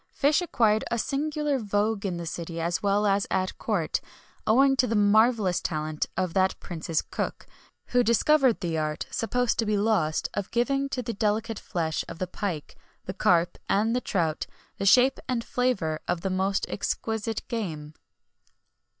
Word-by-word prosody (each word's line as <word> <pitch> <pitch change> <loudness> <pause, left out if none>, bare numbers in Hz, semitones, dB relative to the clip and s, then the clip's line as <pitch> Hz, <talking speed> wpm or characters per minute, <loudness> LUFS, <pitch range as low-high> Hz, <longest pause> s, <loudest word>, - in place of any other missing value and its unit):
fish 295 +4 +3
acquired 220 -10 +2
a 235 - 0
singular 295 +3 -1
vogue 205 -1 0
in 180 -2 -3
the 170 - -5
city 165 0 -5
as 170 +1 -1
well 205 +1 +2
as 200 0 +2
at 185 0 -1
court, - - -1 0.5
owing 270 +5 +5
to 260 -1 +2
the 225 - 0
marvellous 210 -3 +3
talent 155 -2 -2
of 185 -3 -1
that 190 0 +2
prince's 165 -2 -3
cook, - - -4 0.4
who 245 - +3
discovered 255 +1 +3
the 170 -3 -2
art, 155 -1 -2
supposed 245 +1 0
to - - +3
be 210 -1 +2
lost, 200 -7 +1
of 200 -2 -3
giving 275 +4 0
to 250 -2 -3
the 235 - -3
delicate 220 +1 -1
flesh 160 -2 -2
of 165 - -7
the 185 - -2
pike, 180 -4 -5 0.3
the 190 - -4
carp, 175 -2 +2
and 220 +4 +2
the 250 - 0
trout, 165 -8 -1 0.3
the 195 - 0
shape 255 +5 +5
and 240 -2 0
flavour 195 -14 0
of 170 - -1
the 190 - -2
most 190 +1 0
exquisite 220 +1 -3
game. 160 -10 -4
205 Hz, 165 wpm, -27 LUFS, 175-235 Hz, 0.5 s, owing